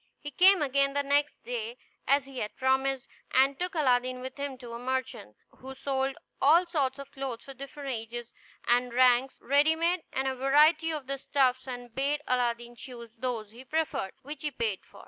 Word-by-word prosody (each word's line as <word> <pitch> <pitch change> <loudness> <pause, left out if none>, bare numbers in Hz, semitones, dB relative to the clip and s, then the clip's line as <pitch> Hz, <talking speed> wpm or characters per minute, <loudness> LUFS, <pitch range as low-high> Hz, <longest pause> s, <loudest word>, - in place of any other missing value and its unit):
He 290 - -7
came 370 +3 +6
again 275 0 +2
the 285 0 +1
next 285 +1 +1
day, 475 0 -4 0.3
as 280 -1 +3
he 270 -2 -8
had 210 - -4
promised, 265 0 +1 0.3
and 270 +1 +4
took 360 0 -2
Aladdin 255 -4 +2
with 260 +1 -7
him 280 -2 -4
to 240 -2 -9
a 235 - -5
merchant, 255 - -3 0.2
who 265 +1 -9
sold 270 0 -1 0.2
all 325 +6 +6
sorts 285 -6 -1
of 275 -1 -9
clothes 265 -4 -5
for 275 - -9
different 275 +1 -8
ages 235 0 -5 0.3
and 245 0 +2
ranks 255 +1 +4
ready 290 +4 +4
made, 340 +2 +1
and 265 0 -1
a 265 - 0
variety 300 +5 +4
of 305 -4 -3
fine 275 +1 -4
stuffs, 260 -2 +1
and 245 -2 -7
bade 285 +3 0
Aladdin 240 -1 0
choose 235 -1 -10
those 230 -4 -3
he 240 +3 -12
preferred, 305 -9 -2
which 290 +1 -7
he 300 - -1
paid 225 -7 -2
for. - - -17
265 Hz, 190 wpm, -29 LUFS, 250-290 Hz, 0.3 s, came